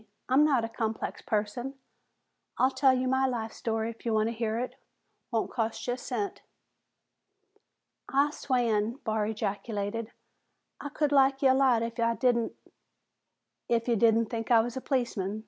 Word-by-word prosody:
I'm 265 +4 +5
not 270 -7 +3
a - - -6
complex 220 0 -3
person. 225 +5 -2 0.8
I'll 260 +1 +3
tell 265 -1 +4
you 255 0 0
my 265 +1 +2
life 225 -3 -3
story 225 0 -2
if 230 - -16
you 230 - 0
want 215 +1 +2
to - - -3
hear 225 -1 -2
it. 250 +2 -3 0.6
Won't 225 -2 -1
cost 225 -2 -2
you 245 - 0
a - - -5
cent." 225 -5 -4 1.7
"I 280 +2 +3
swan!" 235 -6 0
Barr 215 -2 0
ejaculated. 215 +1 -3 0.7
"I 290 - -5
could 295 0 0
like 270 -1 +4
ye 265 - +6
a - - +6
lot 260 -4 +3
if'n 230 0 -2
I 230 0 +2
didn't 240 -2 +1 0.6
" - - -55
"If 230 - -6
you 235 - +3
didn't 230 +1 +4
think 225 -2 -3
I 230 -2 +6
was 240 +2 -4
a 260 - -4
policeman? 235 -8 -1
235 Hz, 170 wpm, -29 LUFS, 220-260 Hz, 1.7 s, ye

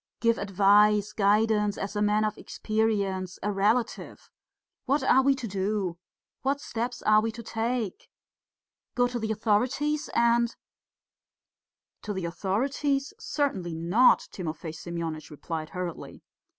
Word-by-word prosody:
"Give 230 -1 +2
advice, 205 +1 +4
guidance, 210 0 +2
as 200 +1 -4
a 210 - 0
man 210 +1 +2
of 215 -1 -2
experience, 200 -4 -1
a 210 - 0
relative! 215 +4 -1 0.5
What 275 +1 +1
are 265 0 +5
we 275 +1 +3
to 255 -3 -5
do? 195 -3 -2 0.4
What 275 +1 0
steps 240 -1 -4
are 215 0 +5
we 225 +1 -1
to 235 - -8
take? 225 -2 -3 0.9
Go 245 0 +3
to 245 0 -4
the 220 -1 -2
authorities 255 +8 0
and 235 0 +3 0.7
..." - - -64
"To 210 - -4
the 190 -3 -3
authorities? 270 - -1
Certainly 195 - -2
not," 175 +10 +4
Timofey 160 -3 -5
Semyonitch 165 -1 -5
replied 155 +1 -5
hurriedly. 180 -3 -6
210 Hz, 130 wpm, -27 LUFS, 190-235 Hz, 0.9 s, are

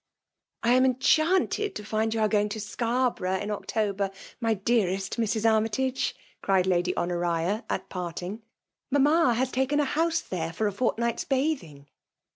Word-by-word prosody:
" - - -50
I 235 +1 +4
am 255 +1 +5
enchanted 315 - +2
to 210 - -6
find 220 +1 0
you 225 0 -1
are 215 - +4
going 210 -1 +1
to 220 +1 -5
Scarborough 230 -3 -1
in 205 +2 -4
October, 205 -1 -1 0.3
my 225 -2 +1
dearest 195 -2 0
Mrs. 220 0 0
Arraytage," 225 +4 +1 0.3
cried 190 -2 +2
Lady 180 -1 +1
Honoria, 175 +4 0
at - - -2
parting. 180 +3 -5 0.2
'* - - -62
Mamma 285 -1 +4
has 260 +2 0
taken 265 +3 +1
a 295 - +3
house 325 +4 +1
there 165 -2 -4
for 215 - -1
a 205 - +1
fort 215 +2 0
night's 235 0 -1
bathing. 260 - -2
220 Hz, 165 wpm, -27 LUFS, 190-255 Hz, 0.3 s, am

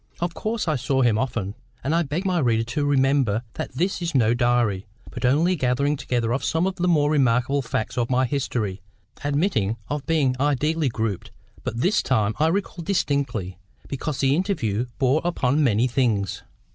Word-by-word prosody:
Of 175 0 -2
course 215 0 -3
I 155 -2 +1
saw 130 +1 +1
him 115 -3 +3
often—and 120 +3 -4
I 170 - +3
beg 160 +5 -3
my 185 -2 +1
reader 115 -5 +2
to 120 +6 -2
remember 135 -5 +2
that - - -5
this 180 +7 -1
is 170 -3 -3
no 115 -3 +4
diary, 120 -5 +1 0.2
but 125 - -4
only 155 +8 +3
a - - 0
gathering 140 +1 +1
together 120 -4 -1
of 135 - -1
some 165 +2 +1
of 190 0 -2
the 180 - 0
more 150 -4 +3
remarkable 135 -1 +2
facts 115 -1 -3
of 120 - 0
my 130 0 +2
history, 115 -8 -2 0.4
admitting 140 - 0
of 145 -1 -3
being 145 -6 +2
ideally 145 +2 +1
grouped—but 110 0 -5
this 200 +7 +3
time 110 -4 +1
I 155 - +4
recall 185 0 -2
distinctly 140 - -1 0.3
because 140 +1 -3
the 135 0 +3
interview 125 - -1
bore 135 +3 +2
upon 150 -4 +1
many 115 -2 +3
things. 115 -7 0
135 Hz, 175 wpm, -24 LUFS, 115-155 Hz, 0.4 s, no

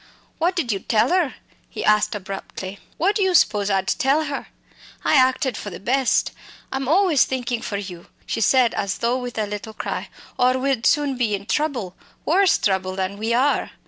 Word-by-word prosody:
"What 350 +3 +1
did 300 -10 0
you 195 - -1
tell 220 - +1
'er?" 350 -7 +1 0.3
he - - -5
asked 210 +1 +3
abruptly. 195 0 -7 0.2
"What 390 +5 +2
do 420 - 0
you 380 -2 +2
spose 210 -8 +3
I'd 190 -1 0
tell 290 +2 +2
her? 285 -2 -5 0.6
I - - +3
acted 260 -2 +3
for 210 - -6
the 175 - -8
best. 255 +4 +1 0.4
I'm 265 -1 -3
always 340 -2 +4
thinkin' 245 -2 -3
for 205 - -3
you!" 180 -4 -8 0.2
she - - -3
said 250 0 +4
as 195 -1 -2
though 240 +2 0
with 245 -2 -6
a 215 - 0
little 210 +2 -6
cry, - - -4 0.3
"or 255 +1 +4
we'd 260 -3 0
soon 285 -3 +2
be 225 -4 +1
in 200 0 -8
trouble 255 - -1 0.3
worse 375 +3 +4
trouble 190 -2 0
than 190 +1 -3
we 220 +2 -1
are!" 270 +4 +1
245 Hz, 190 wpm, -22 LUFS, 205-280 Hz, 0.6 s, always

